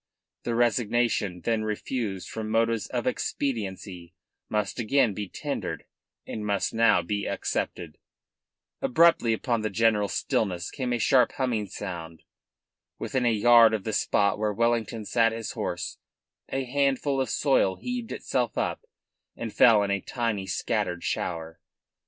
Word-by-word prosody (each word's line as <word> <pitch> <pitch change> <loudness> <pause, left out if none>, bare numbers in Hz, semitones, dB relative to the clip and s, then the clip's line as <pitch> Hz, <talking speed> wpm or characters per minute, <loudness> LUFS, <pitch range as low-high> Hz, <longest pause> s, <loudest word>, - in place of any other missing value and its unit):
The 120 - -1
resignation 115 -5 +1
then 115 +3 0
refused 110 -2 -3
from 110 -1 -5
motives 115 0 +1
of - - -3
expediency 95 -8 -3 0.3
must 105 0 -1
again 120 -1 +2
be 100 0 -5
tendered - - -4 0.4
and 110 - -5
must 100 -1 -1
now 115 -6 +4
be 100 +3 -2
accepted. 80 -4 -3 0.8
Abruptly 165 -5 +4
upon 115 +1 0
the 110 - -1
general 105 0 +2
stillness 90 -4 -1
came 125 -2 -3
a 120 - +1
sharply 125 +2 +3
humming 120 -6 0
sound. 85 -5 -7 0.7
Within 130 -2 -1
a - - +4
yard 115 +1 +6
of 105 - -5
the 110 - -3
spot 100 0 +2
where 105 -1 +1
Wellington 115 0 0
sat 115 +1 +2
his 115 -1 -4
horse - - -4 0.5
a 135 0 -1
handful 135 +1 +1
of 130 - -2
soil 130 -8 +2
heaved 245 - -5
itself 125 -4 -2
up - - -1 0.5
and 115 -2 -5
fell 110 -4 +6
in 100 - -1
a 100 -1 0
tiny 115 -6 -2
scattered 90 -2 -1
shower. 80 -2 -3
110 Hz, 140 wpm, -27 LUFS, 100-120 Hz, 0.8 s, yard